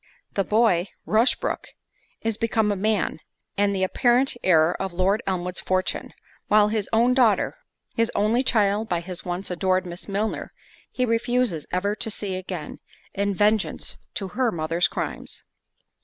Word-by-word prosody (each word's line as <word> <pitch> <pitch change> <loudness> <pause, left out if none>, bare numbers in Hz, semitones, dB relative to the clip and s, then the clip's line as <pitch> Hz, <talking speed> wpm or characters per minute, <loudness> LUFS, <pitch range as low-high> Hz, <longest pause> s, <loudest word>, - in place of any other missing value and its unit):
The 195 - +1
boy, 210 -4 +3 0.2
Rushbrook, 225 +4 +1 0.6
is 225 -1 0
become 220 -1 +1
a - - 0
man, 205 -4 0 0.4
and 200 0 +2
the 190 - 0
apparent 245 +7 +3
heir 165 -2 +4
of 190 -2 -3
Lord 190 +5 +2
Elmwood's 180 -1 -2
fortune; 185 0 -1 0.4
while 210 0 +5
his 215 -2 -1
own 235 +3 +4
daughter, 240 -5 +3 0.4
his 230 0 +1
only 220 +4 +3
child 215 -3 +2
by 175 - +1
his 180 0 -6
once 180 +1 -4
adored 185 +1 +1
Miss 175 0 -8
Milner, 210 +2 -2 0.4
he 255 - 0
refuses 230 - 0
ever 200 +3 0
to 225 - -2
see 205 -2 -3
again, 185 -4 -6 0.3
in 200 0 0
vengeance 210 +1 +1 0.2
to 195 -2 -3
her 245 +5 +1
mother's 165 +1 +1
crimes. - - -5
200 Hz, 150 wpm, -24 LUFS, 185-225 Hz, 0.6 s, while